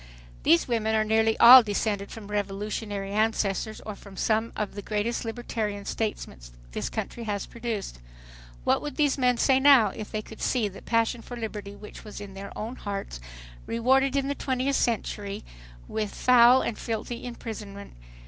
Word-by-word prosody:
These 170 - +4
women 220 -2 0
are 215 - +3
nearly 220 +1 +2
all 250 +2 +11
descended 205 -2 -2
from 220 -2 -9
revolutionary 205 0 -3
ancestors 215 0 0
or 215 - -5
from 200 -1 -14
some 220 +1 +1
of 210 -2 -3
the 205 - -6
greatest 215 +3 -2
libertarian 220 -3 -4
statesmen 210 - -3 0.3
this - - -3
country 230 - -5
has 205 -2 -2
produced. 230 - -5 0.6
What - - +2
would 295 -3 -5
these 290 -3 +1
men 250 -1 +3
say 265 +2 +4
now 265 -6 +6
if 210 +2 -8
they 215 0 -3
could 220 - -12
see 240 -5 +1
that 195 - -13
passion 230 +1 +1
for 245 +1 -8
liberty 210 -3 -6
which 210 +1 -11
was 210 -1 -9
in 200 -1 -9
their 195 +1 -8
own 225 +4 -5
hearts 195 - -5 0.5
rewarded 265 +4 +2
in 275 -1 +1
the 280 - 0
twentieth 265 0 -1
century 205 -4 -2 0.4
with 215 -2 -3
foul 250 +1 +6
and 230 - -3
filthy 230 +1 -4
imprisonment! 215 -4 -8
220 Hz, 165 wpm, -26 LUFS, 205-240 Hz, 0.6 s, all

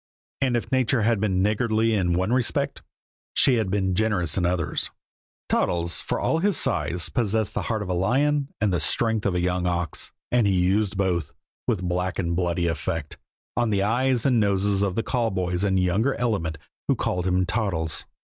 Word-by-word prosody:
And 130 -3 +2
if 115 - -5
nature 130 -3 +2
had 115 -1 +2
been 95 -3 +1
niggardly 110 +1 +1
in 90 -4 +1
one 95 +6 0
respect, 130 -2 0 0.5
she 130 -3 +4
had 110 -4 0
been 95 -1 0
generous 100 -4 0
in 90 -2 +1
others; 85 -4 -1 0.6
Toddles, 85 0 0
for - - -2
all 160 - +1
his 195 -2 +1
size, 85 -1 0
possessed 110 -2 0
the - - -1
heart 110 -3 -2
of 95 - -7
a - - 0
lion 135 +10 +1
and 105 -3 +1
the 90 - +1
strength 110 +7 +1
of 95 - -1
a - - +1
young 90 0 0
ox, 85 -3 -2 0.2
and 120 -4 +3
he 100 - +2
used 95 +2 +1
both, 90 -5 0 0.4
with 100 -7 0
black 90 +1 -1
and 85 -2 -1
bloody 85 -1 0
effect, 80 -2 -3 0.4
on 120 -1 +1
the 100 -2 +1
eyes 125 +3 +1
and 125 -4 +4
noses 100 -1 +2
of 100 -2 0
the 115 - 0
call 120 -2 0
boys 90 -2 -1
and 95 -2 +2
younger 100 +9 +1
element 100 -10 -1 0.3
who - - +3
called 90 0 -1
him 95 0 +2
Toddles. 90 -6 -1
100 Hz, 190 wpm, -25 LUFS, 90-115 Hz, 0.6 s, she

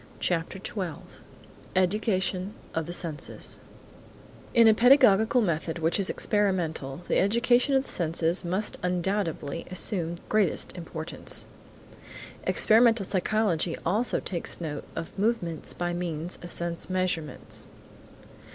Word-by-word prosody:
CHAPTER 170 +1 -1
XII 190 -5 -5 0.7
EDUCATION 190 0 +1 0.2
OF 165 -1 -2
THE - - -4
SENSES 165 -4 -4 1.0
IN 230 -1 +7
a 220 - +8
pedagogical 245 -1 +5
method 170 -2 -1
which 165 +3 0
is 195 - +1
experimental 175 -8 -1
the - - +2
education 240 +6 +3
of 265 - +3
the - - -8
senses 165 +2 +1
must 185 +5 -1
undoubtedly 180 -4 -2
assume 180 -2 0
the 170 - -15
greatest 210 -6 +1
importance. 165 -2 -3 1.0
Experimental 225 -1 +4
psychology 185 -3 0
also 215 +8 +1
takes 175 -3 -3
note 150 -4 -5
of 165 - -6
movements 195 -7 0
by 175 0 -1
means 175 -1 -3
of 175 - -8
sense 170 0 -2
measurements. 180 -6 -2
180 Hz, 115 wpm, -27 LUFS, 165-210 Hz, 1.0 s, a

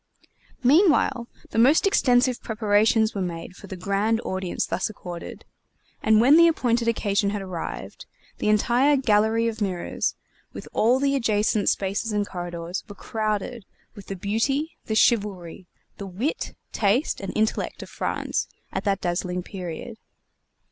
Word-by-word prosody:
Meanwhile 275 - +4 0.2
the - - 0
most 275 - +5
extensive 255 - +3
preparations 220 0 +2
were 200 - -3
made 175 0 -5
for 200 - -12
the 190 - -6
grand 200 +4 0
audience 190 -4 -2
thus 170 +5 -2
accorded; 175 -5 -8 0.6
and 215 0 +4
when 270 +7 +6
the 335 0 +8
appointed 240 -7 +1
occasion 205 -3 +1
had 205 -1 -3
arrived, 185 -3 -6 0.3
the - - 0
entire 245 +7 +3
Gallery 225 -2 +2
of 225 -1 -4
Mirrors 185 -4 -2 0.4
with - - -8
all 240 +4 +3
the 280 0 +1
adjacent 215 -4 +1
spaces 200 +3 -1
and 205 -1 0
corridors, 175 0 -5
were 205 - -9
crowded 215 +1 -3 0.3
with 205 -3 -12
the 195 - -4
beauty, 250 - -1
the 220 - -2
chivalry, 195 -6 +1 0.3
the 200 - -6
wit, 215 - -3 0.2
taste, 215 +7 +1
and 195 - -4
intellect 220 0 -1
of - - -12
France - - -2 0.3
at - - -2
that 195 -2 +1
dazzling 180 0 -2
period. 185 +4 -7
215 Hz, 145 wpm, -24 LUFS, 195-235 Hz, 0.6 s, the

